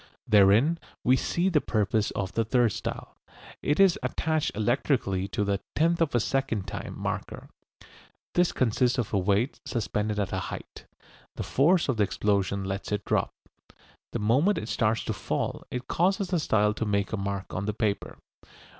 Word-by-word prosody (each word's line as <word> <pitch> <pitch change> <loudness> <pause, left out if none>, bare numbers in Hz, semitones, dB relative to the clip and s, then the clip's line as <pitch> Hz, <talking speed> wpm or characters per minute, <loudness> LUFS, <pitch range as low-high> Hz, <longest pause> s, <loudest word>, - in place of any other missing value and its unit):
Therein 110 +10 +5 0.2
we 125 - +5
see 170 +7 0
the 165 -6 +3
purpose 110 -1 0
of 95 -2 -3
the 115 - 0
third 120 0 +2
style. - - -5 0.5
It 145 +4 0
is 195 -3 +5
attached 155 -1 0
electrically 110 -4 0
to 105 - -1
the 100 -1 0 0.2
"tenth 170 +2 +2
of 160 -6 +1
a - - +4
second 120 -5 -1
time 95 - -6
marker." - - -5 0.8
This 175 0 +3
consists 125 +1 +1
of 120 -4 -2
a 100 - +3
weight 100 +7 +1
suspended 105 -2 -2
at 100 -3 -2
a - - 0
height. - - -9 0.5
The - - -4
force 170 +6 +3
of 130 -5 0
the 105 - +4
explosion 100 -1 0
lets 95 +1 -4
it 105 0 -2
drop. - - +1 0.8
The - - -2
moment 130 - +2
it 105 - -4
starts 110 0 +1
to - - -2
fall - - -3
it 125 0 -5
causes 190 +2 +1
the 180 -2 +1
style 105 -7 +2
to 110 - -3
make 100 0 0
a - - 0
mark 100 0 -4
on 100 +2 -3
the 105 - 0
paper. 105 -3 -2
110 Hz, 175 wpm, -27 LUFS, 100-140 Hz, 0.8 s, Therein